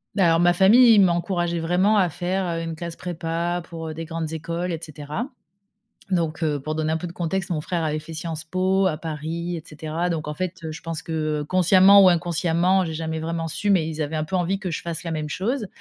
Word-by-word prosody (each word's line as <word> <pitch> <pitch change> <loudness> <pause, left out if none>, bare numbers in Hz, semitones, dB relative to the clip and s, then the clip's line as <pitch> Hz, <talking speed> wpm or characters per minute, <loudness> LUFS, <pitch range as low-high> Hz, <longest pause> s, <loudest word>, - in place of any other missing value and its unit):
Bah, 195 -3 +4
alors 165 0 +4
ma 175 0 +5
famille, 225 +7 +6
ils - - +6
m'encourageaient 175 -1 +1
vraiment 180 +6 +2
à 185 -3 +3
faire, 185 +4 -2
heu, - - -3
une 165 -1 -4
classe 170 +1 -6
prépa 170 0 -2
pour, 165 -1 -6
heu, 155 - -5
des 165 +1 -6
grandes 160 -1 -4
écoles 170 +2 -3
et 165 - -3
cetera. 155 - -5 0.8
Donc 165 -3 -1
heu, 150 -2 +1
pour 155 +3 -4
donner 155 0 -1
un 160 - +1
peu 165 - -4
de 170 - -7
contexte, 175 +2 -2
mon 160 -3 0
frère 170 +1 -2
avait 155 -1 -1
fait 155 +2 -9
Sciences 165 0 -5
Po 190 +2 +1
à 165 -5 +1
Paris 165 +2 -4
et 160 - -7
cetera. 155 +3 -3
Donc 165 -3 -2
en 150 - -3
fait, 185 +3 -4
heu, 160 - -4
je 155 - -8
pense 165 -1 -5
que, 155 -2 -2
heu, - - -6
consciemment 185 +4 +6
ou 190 - +8
inconsciemment, 175 +1 +2
j'ai 160 - -4
jamais 160 0 -3
vraiment 165 +1 -3
su, 185 +6 -3
mais 185 -6 +3
ils 160 -1 -5
avaient 155 +1 -2
un 155 - -1
peu 185 +5 -2
envie 180 +2 0
que 190 -3 -4
je 160 - -3
fasse 165 -1 -5
la 165 - -3
même 155 -2 -3
chose. 220 - -2
170 Hz, 245 wpm, -23 LUFS, 160-180 Hz, 0.8 s, ou